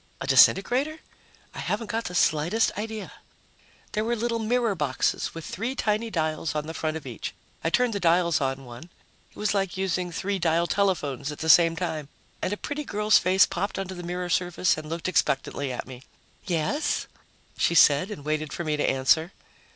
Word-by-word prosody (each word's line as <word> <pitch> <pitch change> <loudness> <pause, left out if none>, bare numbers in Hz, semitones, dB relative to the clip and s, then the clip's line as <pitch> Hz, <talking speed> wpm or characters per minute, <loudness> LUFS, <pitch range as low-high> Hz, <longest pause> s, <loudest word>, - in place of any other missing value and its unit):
A - - -4
disintegrator? 240 - +4 0.6
I - - -8
haven't 230 - -2
got 225 +1 -2
the 180 - -5
slightest 165 +7 +2
idea. 220 +1 -5 0.8
There 215 - -1
were 235 +2 0
little 230 0 -1
mirror 230 0 +1
boxes 150 -4 -1
with 165 - -7
three 230 +7 -3
tiny 220 -1 0
dials 155 -4 -2
on 150 0 -1
the 160 - -6
front 155 0 -2
of 155 - -11
each. 120 -5 -6 0.3
I 165 - +1
turned 245 +5 +2
the 200 - -2
dials 170 -3 +3
on 135 0 -2
one 120 +4 -10 0.4
it - - -28
was 210 -1 0
like 195 -3 -1
using 185 -2 -1
three 195 +3 -2
dial 165 0 +2
telephones 155 -7 0
at 150 - -8
the 160 - -3
same 165 0 +7
time 160 -4 -4 0.3
and - - -1
a 205 - -2
pretty 295 +6 -4
girl's 210 -4 +3
face 185 +2 +4
popped 200 +3 -3
onto 190 -1 -4
the 175 - -7
mirror 180 +1 -4
surface 180 0 +1
and 155 0 -8
looked 165 +2 -3
expectantly 140 -5 0
at 125 - -5
me. 130 -1 -10 0.5
"Yes?" 185 - 0 0.5
she 170 - +1
said, 150 +4 +5
and 150 -9 -8
waited 155 -1 -2
for 175 - -4
me 155 -2 -1
to 145 - +1
answer. 160 +7 +2
175 Hz, 190 wpm, -26 LUFS, 155-205 Hz, 0.8 s, same